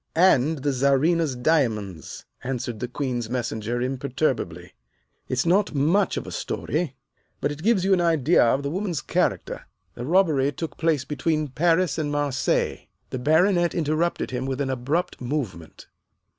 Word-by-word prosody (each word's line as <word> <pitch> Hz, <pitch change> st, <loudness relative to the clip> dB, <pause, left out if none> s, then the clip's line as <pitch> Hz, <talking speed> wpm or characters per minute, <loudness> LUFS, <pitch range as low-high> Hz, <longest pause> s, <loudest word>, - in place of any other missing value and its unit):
"And 160 Hz, -4 st, +3 dB
the 145 Hz, -1 st, +1 dB
Czarina's 140 Hz, +3 st, +2 dB
diamonds," 115 Hz, -, -1 dB, 0.2 s
answered 125 Hz, -3 st, -3 dB
the 125 Hz, -, -3 dB
Queen's 125 Hz, -3 st, -3 dB
Messenger 120 Hz, -1 st, -2 dB
imperturbably. 135 Hz, +3 st, -2 dB, 0.6 s
"It's 130 Hz, +3 st, 0 dB
not 185 Hz, -1 st, +2 dB
much 170 Hz, +8 st, +2 dB
of -, -, -3 dB
a -, -, -7 dB
story, 150 Hz, 0 st, -3 dB, 0.4 s
but 145 Hz, -, 0 dB
it 145 Hz, +1 st, -7 dB
gives 200 Hz, -1 st, +2 dB
you 195 Hz, -, +4 dB
an 180 Hz, -, +3 dB
idea 165 Hz, -2 st, +4 dB
of 125 Hz, +4 st, +2 dB
the 140 Hz, -, -2 dB
woman's 185 Hz, -2 st, -2 dB
character. -, -, -1 dB, 0.3 s
The 120 Hz, -, -7 dB
robbery 155 Hz, -6 st, +3 dB
took 165 Hz, +4 st, -5 dB
place 160 Hz, -5 st, +1 dB
between 150 Hz, +1 st, -1 dB
Paris 165 Hz, +3 st, +2 dB
and 145 Hz, -2 st, -1 dB
Marseilles." 145 Hz, -3 st, 0 dB, 0.2 s
The 130 Hz, -, -3 dB
Baronet 175 Hz, +5 st, +3 dB
interrupted 160 Hz, 0 st, 0 dB
him 130 Hz, +1 st, -3 dB
with 135 Hz, 0 st, -3 dB
an 135 Hz, -2 st, -1 dB
abrupt 135 Hz, +8 st, -2 dB
movement. 120 Hz, -, -4 dB
145 Hz, 150 wpm, -24 LUFS, 125-165 Hz, 0.6 s, you